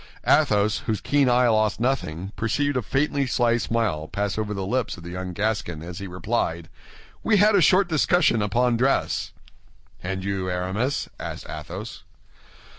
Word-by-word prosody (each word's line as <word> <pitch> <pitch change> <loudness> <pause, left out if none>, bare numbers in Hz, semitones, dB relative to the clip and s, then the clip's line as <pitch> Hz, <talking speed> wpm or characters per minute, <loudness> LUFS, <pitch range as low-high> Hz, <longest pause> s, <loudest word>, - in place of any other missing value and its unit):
Athos, 110 -8 +3
whose 110 -3 0
keen 145 +1 +2
eye 125 0 +4
lost 110 -2 +2
nothing, 100 -8 -2
perceived 145 +6 0
a 125 - +1
faintly 140 +4 0
sly 120 -1 +2
smile 110 -10 -1
pass 100 +3 -2
over 110 -1 -3
the 100 -2 -3
lips 120 +1 -1
of 85 - -12
the 85 - -7
young 90 0 -5
Gascon 100 -5 -2
as 90 +2 -7
he 100 - -6
replied, 90 -2 -2 0.5
"We 220 -1 +3
had 210 +2 +5
a 200 - +5
short 185 +5 +5
discussion 160 - +2
upon 120 +4 +1
dress." 130 +3 0 0.7
"And 95 +1 -4
you, 95 -1 -2
Aramis?" 95 +10 -1
asked - - -6
Athos. 85 +8 -7
110 Hz, 160 wpm, -24 LUFS, 95-130 Hz, 0.7 s, had